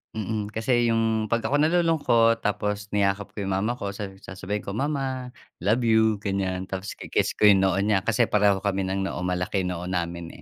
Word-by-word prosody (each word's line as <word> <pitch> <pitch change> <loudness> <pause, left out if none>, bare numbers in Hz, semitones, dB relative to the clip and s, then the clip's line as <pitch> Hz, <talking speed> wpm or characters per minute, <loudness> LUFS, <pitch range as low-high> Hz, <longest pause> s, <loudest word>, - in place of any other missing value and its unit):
mm, 105 -1 -3
kasi 120 +1 +2
'yung 110 -1 +1
'pag 115 +2 0
ako 145 - +1
nalulungkot 155 -9 +3
tapos 105 -1 -2
niyakap 100 0 0
ko 105 - -3
'yung 95 - -3
mama 110 +5 0
ko, 100 -5 -4
sa 100 0 -4 0.2
sasabihin 100 +2 -5
ko, 100 - -5
"Mama, 135 -1 -2 0.3
love 115 +4 +2
you." 110 -1 +4
Ganiyan, 95 -2 -2
tapos 95 +1 -5
ki - - -9
kiss - - +1
ko - - -3
'yung 100 -2 +6
noo 95 -2 +2
niya, 100 -2 +2
kasi 115 +1 +3
pareho 100 -2 +3
kami 100 -1 0
ng 95 +1 -1
noo, 90 - -5
malaki 90 +1 -1
noo 90 -1 -4
namin, 85 -2 -3
105 Hz, 195 wpm, -25 LUFS, 95-115 Hz, 0.3 s, yung